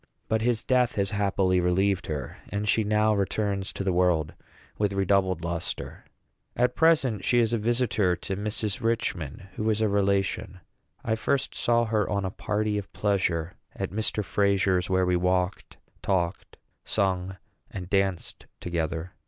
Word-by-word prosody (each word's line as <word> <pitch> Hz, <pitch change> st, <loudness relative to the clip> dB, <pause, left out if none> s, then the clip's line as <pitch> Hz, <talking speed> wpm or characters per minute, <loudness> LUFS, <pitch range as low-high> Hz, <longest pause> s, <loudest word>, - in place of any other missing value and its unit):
But 110 Hz, 0 st, +1 dB
his 120 Hz, -1 st, +1 dB
death 125 Hz, -2 st, +2 dB
has 100 Hz, -2 st, 0 dB
happily 100 Hz, -2 st, +2 dB
relieved 95 Hz, +2 st, +1 dB
her; 75 Hz, -3 st, -4 dB
and 100 Hz, +2 st, -2 dB
she 110 Hz, -, +3 dB
now 105 Hz, +1 st, +2 dB
returns 100 Hz, -1 st, -1 dB
to -, -, -4 dB
the 95 Hz, -2 st, +1 dB
world 85 Hz, -4 st, +2 dB, 0.5 s
with 105 Hz, -1 st, +1 dB
redoubled 95 Hz, -3 st, +1 dB
lustre. 85 Hz, 0 st, -4 dB, 0.5 s
At 125 Hz, +1 st, +1 dB
present 150 Hz, -9 st, +3 dB
she 120 Hz, -, +2 dB
is 115 Hz, -1 st, +3 dB
a 115 Hz, -, +1 dB
visitor 110 Hz, -5 st, +1 dB
to 95 Hz, -, -5 dB
Mrs. 105 Hz, +1 st, -3 dB
Richman, 95 Hz, -, -2 dB
who 110 Hz, +1 st, 0 dB
is 110 Hz, -1 st, +1 dB
a 110 Hz, -, +2 dB
relation. 100 Hz, -2 st, 0 dB, 0.5 s
I 110 Hz, -, +1 dB
first 130 Hz, +4 st, 0 dB
saw 120 Hz, 0 st, +2 dB
her 110 Hz, -2 st, 0 dB
on 100 Hz, -1 st, -1 dB
a 95 Hz, -, -2 dB
party 105 Hz, +1 st, -1 dB
of 100 Hz, -, -9 dB
pleasure 90 Hz, -5 st, 0 dB, 0.2 s
at -, -, -3 dB
Mr. 105 Hz, 0 st, -1 dB
Frazier's, 100 Hz, -3 st, +2 dB
where 95 Hz, 0 st, +2 dB
we 90 Hz, 0 st, +2 dB
walked, 90 Hz, +1 st, 0 dB, 0.2 s
talked, 90 Hz, -2 st, -1 dB, 0.3 s
sang, 95 Hz, -1 st, -1 dB, 0.3 s
and 90 Hz, -2 st, -6 dB
danced 95 Hz, -2 st, -1 dB
together. 85 Hz, 0 st, -3 dB
100 Hz, 155 wpm, -27 LUFS, 90-110 Hz, 0.5 s, she